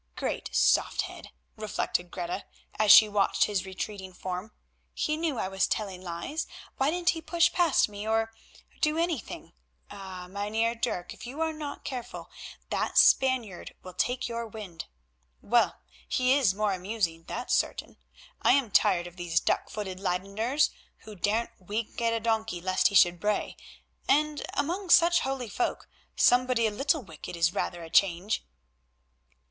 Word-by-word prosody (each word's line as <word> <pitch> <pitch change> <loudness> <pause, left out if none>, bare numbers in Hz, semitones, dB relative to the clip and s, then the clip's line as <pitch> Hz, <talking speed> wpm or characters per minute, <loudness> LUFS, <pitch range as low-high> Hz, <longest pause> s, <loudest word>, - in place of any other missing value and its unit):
"Great - - -3
soft 60 0 +3
head," - - -9 0.3
reflected 210 -4 -2
Greta, 175 +2 -4 0.3
as 215 -1 +6
she 215 - +10
watched 205 -1 +2
his 195 -3 -1
retreating 190 0 -6
form, 185 +3 -5 0.4
"he 305 - 0
knew 315 -4 -1
I 190 - -1
was 195 0 +1
telling 195 -4 -3
lies, 185 - -4 0.3
why 270 +2 +2
didn't 350 +2 +2
he 325 - -6
push 335 +2 +2
past 345 -5 +3
me, 205 0 -7
or—do 225 +7 -2
anything. 330 - -3 0.4
Ah! 190 -2 -8
Mynheer 210 +4 -1
Dirk, 180 -6 -3
if - - -10
you 270 +5 -8
are 320 0 0
not 300 -2 -7
careful 250 -3 -6 0.4
that - - -1
Spaniard 250 -8 +3
will 185 - -9
take 250 +6 -1
your 235 -1 -4
wind. 205 -6 -8 0.5
Well, 235 +2 +2 0.3
he 255 0 +2
is 255 -9 +3
more 210 -1 +1
amusing, 180 -4 -2
that's 245 - -3
certain. - - -1 0.4
I - - +5
am 265 -6 +1
tired 175 -2 +3
of 175 +1 -11
these 170 -1 +1
duck - - -1
footed 190 -3 -5
Leydeners, 200 +9 0 0.3
who 215 - -11
daren't 220 +4 -1
wink 215 +5 -4
at 230 0 +2
a 230 - 0
donkey 220 -4 -1
lest 185 +1 +2
he 200 - -3
should 175 -2 +5
bray, 210 +2 -1 0.5
and 300 +1 +2
among 350 +6 -2
such 345 0 +6
holy 265 -2 -3
folk 355 - -2 0.3
somebody 250 -1 +4
a 220 - +1
little 280 +6 0
wicked 165 -2 -9
is 170 +1 +2
rather 175 -1 -3
a 165 - -9
change." 195 +2 +2
215 Hz, 155 wpm, -28 LUFS, 185-260 Hz, 0.5 s, she